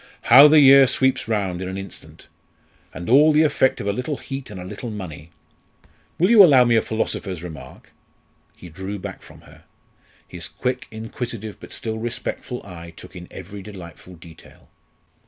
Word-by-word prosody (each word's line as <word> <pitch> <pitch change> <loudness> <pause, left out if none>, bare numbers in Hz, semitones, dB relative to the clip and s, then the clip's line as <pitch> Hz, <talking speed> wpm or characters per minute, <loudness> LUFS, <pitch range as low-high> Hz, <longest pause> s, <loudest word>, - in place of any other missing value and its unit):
"How 140 +4 +11
the 155 +1 +6
year 135 -1 +7
sweeps 130 -1 0
round 100 -5 -2
in 95 - -4
an 95 - -6
instant! 95 0 -11 0.7
And 85 +2 -8
all 145 +6 +6
the 155 +1 +4
effect 130 -3 +1
of - - -5
a 100 - 0
little 125 +6 -4
heat 135 -1 -8
and 100 -3 -9
a 90 - -8
little 120 +6 -7
money. 85 -7 -8 0.9
Will 180 +6 +2
you 220 -4 +9
allow 140 -8 +6
me 120 -1 +3
a 110 - +4
philosopher's 95 -6 -4
remark?" 80 -7 -11 0.6
He 90 - -13
drew 95 +5 -7
back 95 0 -8
from - - -16
her. - - -19 0.6
His 85 -1 -7
quick 125 -1 -4
inquisitive 110 -1 -7
but - - -13
still 110 -1 -5
respectful 120 +1 -5
eye 85 -3 -11
took - - -13
in 90 -1 -10
every 95 +2 -10
delightful 90 -2 -12
detail. 85 -1 -17
105 Hz, 175 wpm, -21 LUFS, 90-130 Hz, 0.9 s, How